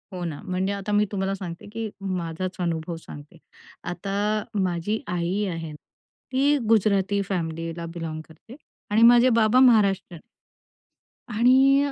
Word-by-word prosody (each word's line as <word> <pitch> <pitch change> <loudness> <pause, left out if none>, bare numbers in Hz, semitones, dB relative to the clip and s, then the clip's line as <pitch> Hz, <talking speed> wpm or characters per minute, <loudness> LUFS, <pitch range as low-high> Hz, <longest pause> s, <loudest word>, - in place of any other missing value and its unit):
हो 180 -1 -5
ना 155 -4 -5
म्हणजे 185 +2 -1
आता 200 +1 -5
मी 205 0 +3
तुम्हाला 195 -1 -1
सांगते 175 -2 -8
की 225 -1 -4
माझाचं 185 -1 -4
अनुभव 165 0 -2
सांगते. 150 0 -12 0.5
आता 200 +4 -2 0.2
माझी 185 +4 -1
आई 180 +3 -1
आहे, 165 -2 -5 0.6
ती 280 +3 +3
गुजराती 200 -2 +2
फॅमिलीला 165 -2 -3
बिलाँग 160 -2 -5
करते 165 +9 -15 0.4
आणि 215 +2 +3
माझे 240 +2 +7
बाबा 220 +3 +4
महाराष्टीयन. 200 -9 +3 1.1
आणि 265 +5 +4
195 Hz, 125 wpm, -24 LUFS, 170-215 Hz, 1.1 s, माझे